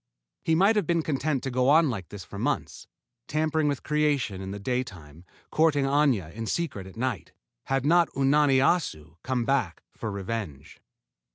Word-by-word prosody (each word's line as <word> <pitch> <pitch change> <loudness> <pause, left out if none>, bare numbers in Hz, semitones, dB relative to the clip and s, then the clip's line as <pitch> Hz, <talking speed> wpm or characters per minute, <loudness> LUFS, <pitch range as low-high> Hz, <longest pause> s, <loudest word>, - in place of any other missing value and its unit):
He 160 - +2
might 195 +6 +4
have 210 - +1
been 170 -2 +1
content 145 -2 -1
to 135 - -3
go 125 +1 +2
on 155 -1 +5
like 95 -7 -6
this 100 -3 -8
for - - -9
months, - - -2 0.4
tampering 155 0 0
with 145 -2 -2
creation 145 -10 0
in 95 - -6
the 100 - -5
day 125 +5 -1
time, 85 - -13 0.3
courting 155 -3 +3
Aña 135 - +1
in 115 0 -5
secret 105 - -3
at 95 - -13
night, 120 -4 -3 0.3
had 135 0 0
not 170 +2 +4
Unani 140 0 +4
Assu 85 - 0
come 125 -2 -1
back 125 -11 0
for 110 - -6
revenge. 100 -8 -6
130 Hz, 175 wpm, -27 LUFS, 100-150 Hz, 0.4 s, on